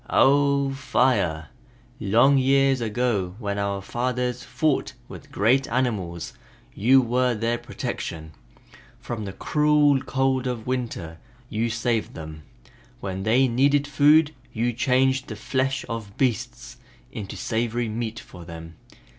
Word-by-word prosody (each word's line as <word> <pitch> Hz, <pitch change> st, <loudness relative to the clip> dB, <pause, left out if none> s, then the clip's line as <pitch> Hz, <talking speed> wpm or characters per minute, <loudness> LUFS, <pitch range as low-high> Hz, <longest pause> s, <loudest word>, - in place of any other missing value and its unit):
"Oh, 140 Hz, 0 st, +3 dB
Fire! 125 Hz, -, +1 dB, 0.5 s
Long 120 Hz, +7 st, +4 dB
years 135 Hz, 0 st, +3 dB
ago 105 Hz, -5 st, -1 dB
when 100 Hz, -3 st, -3 dB
our 100 Hz, -1 st, -2 dB
fathers 125 Hz, +2 st, -2 dB
fought 155 Hz, -3 st, -1 dB
with -, -, -12 dB
great 125 Hz, +6 st, +2 dB
animals 105 Hz, -10 st, -2 dB, 0.4 s
you 130 Hz, +6 st, +5 dB
were 125 Hz, +1 st, +1 dB
their 115 Hz, +2 st, -1 dB
protection. 80 Hz, -1 st, -5 dB, 0.7 s
From 110 Hz, -3 st, -5 dB
the 95 Hz, -, -5 dB
cruel 150 Hz, +3 st, +2 dB
cold 130 Hz, -1 st, 0 dB
of 120 Hz, -3 st, -4 dB
winter, 115 Hz, -11 st, -4 dB, 0.3 s
you 115 Hz, +2 st, 0 dB
saved 115 Hz, -1 st, -1 dB
them. 80 Hz, -1 st, -8 dB, 0.6 s
When 95 Hz, -1 st, -4 dB
they 120 Hz, +6 st, +3 dB
needed 140 Hz, +4 st, +2 dB
food 150 Hz, +2 st, +4 dB, 0.2 s
you 120 Hz, +2 st, -1 dB
changed 130 Hz, +2 st, +1 dB
the 110 Hz, -, -6 dB
flesh 130 Hz, +5 st, -1 dB
of 110 Hz, -3 st, -6 dB
beasts 125 Hz, -6 st, -2 dB, 0.3 s
into 100 Hz, -3 st, -7 dB
savory 120 Hz, +1 st, -1 dB
meat 110 Hz, +1 st, -4 dB
for 90 Hz, -, -12 dB
them. 80 Hz, -1 st, -10 dB
120 Hz, 125 wpm, -24 LUFS, 105-135 Hz, 0.7 s, you